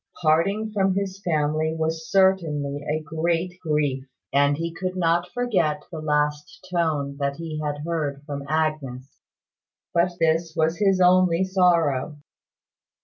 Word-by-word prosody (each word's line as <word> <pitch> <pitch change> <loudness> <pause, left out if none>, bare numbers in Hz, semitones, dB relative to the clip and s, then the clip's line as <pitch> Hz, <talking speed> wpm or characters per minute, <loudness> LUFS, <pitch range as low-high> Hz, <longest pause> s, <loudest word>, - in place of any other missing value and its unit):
Parting 195 +8 +2
from 195 -2 +2
his 195 0 -3
family 155 -2 0
was 160 0 -2
certainly 155 -7 +2
a 155 +1 -1
great 170 +3 -2
grief; 150 -5 0 0.3
and 145 +1 +3
he 165 +1 -3
could 185 +2 -4
not 175 0 +1
forget 185 -12 0
the 165 - -5
last 150 +2 -1
tone 150 -5 0 0.2
he 160 -2 -5
had 145 0 -3
heard 150 -4 -2
from 145 -2 -5
Agnes. 150 -5 -2 0.7
But 175 +1 +2
this 165 0 +1
was 160 +1 +1
his 195 -2 +3
only 180 -1 +4
sorrow. 170 -7 +2
160 Hz, 130 wpm, -24 LUFS, 150-180 Hz, 0.7 s, only